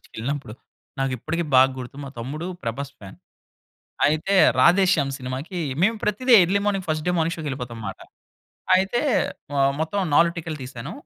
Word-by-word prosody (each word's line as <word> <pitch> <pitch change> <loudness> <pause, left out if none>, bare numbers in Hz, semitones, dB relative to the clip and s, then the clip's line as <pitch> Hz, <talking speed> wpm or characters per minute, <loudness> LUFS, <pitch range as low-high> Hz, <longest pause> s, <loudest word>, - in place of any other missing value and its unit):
సినిమాలకెళ్ళినప్పుడు. 130 -1 -5 0.5
నాకిప్పటికి 135 +6 -2
బాగా 130 +1 +7
గుర్తు. 130 +2 -8
మా - - -7
తమ్ముడు 145 +8 -5 0.2
ప్రభాస్ 140 +5 -4
ఫ్యాన్. 95 -2 -12 0.9
అయితే 155 +6 +1 0.2
'రాధేశ్యామ్' 170 -1 +4
సినిమాకి 135 +7 -5 0.2
మేము 220 +4 +3
ప్రతీది 245 +5 +2
early 190 +4 +1
morning 195 -3 0
first 155 -1 -2
day - - +3
morning 165 +1 0
షో‌కెళ్ళిపోతాం 130 -7 -5
మాట. 95 - -7 0.8
అయితే 195 +6 +1 0.6
ఆహ్, 135 0 +3
మొత్తం 160 +6 -1
4 170 +2 +5
టికెట్లు 160 -2 -5
తీసాను. 130 +3 -7
150 Hz, 140 wpm, -23 LUFS, 130-180 Hz, 0.9 s, బాగా